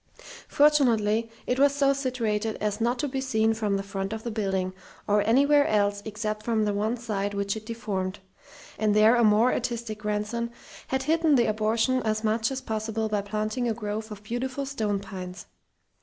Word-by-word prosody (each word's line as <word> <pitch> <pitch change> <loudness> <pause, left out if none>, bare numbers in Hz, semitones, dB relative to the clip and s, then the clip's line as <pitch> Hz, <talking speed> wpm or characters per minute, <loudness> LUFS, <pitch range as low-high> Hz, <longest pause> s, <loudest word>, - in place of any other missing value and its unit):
Fortunately 230 -7 +3 0.2
it 250 - 0
was 280 0 +4
so 275 -1 +3
situated 230 -5 -1
as 210 +1 -2
not 240 +2 +1
to 290 - -1
be 265 0 -3
seen 225 -4 +2
from 210 -3 0
the 195 - -3
front 195 +1 -4
of 220 0 -6
the 235 - -3
building, 195 -4 -1 0.3
or 205 0 +3
anywhere 285 +5 +5
else 205 -1 +1
except 215 0 -3
from 220 -1 0
the 205 - 0
one 215 +4 0
side 205 -4 -3
which 200 0 -1
it 220 0 -8
deformed; 205 -4 -3 0.6
and 210 -1 +2
there 215 +3 +6
a 235 - +3
more 215 +3 +4
artistic 235 -3 -3
grandson 210 +3 -2 0.4
had 265 0 -1
hidden 320 0 +3
the 240 -2 +4
abortion 220 +4 +1
as 215 0 -1
much 220 +1 +1
as 265 -1 -4
possible 220 -2 -2
by 210 -1 0
planting 215 +4 -2
a 225 - -1
grove 215 0 -4
of 210 -1 -9
beautiful 255 +5 -3
stone 215 -7 -1
pines. 185 -2 -8
220 Hz, 185 wpm, -26 LUFS, 210-245 Hz, 0.6 s, there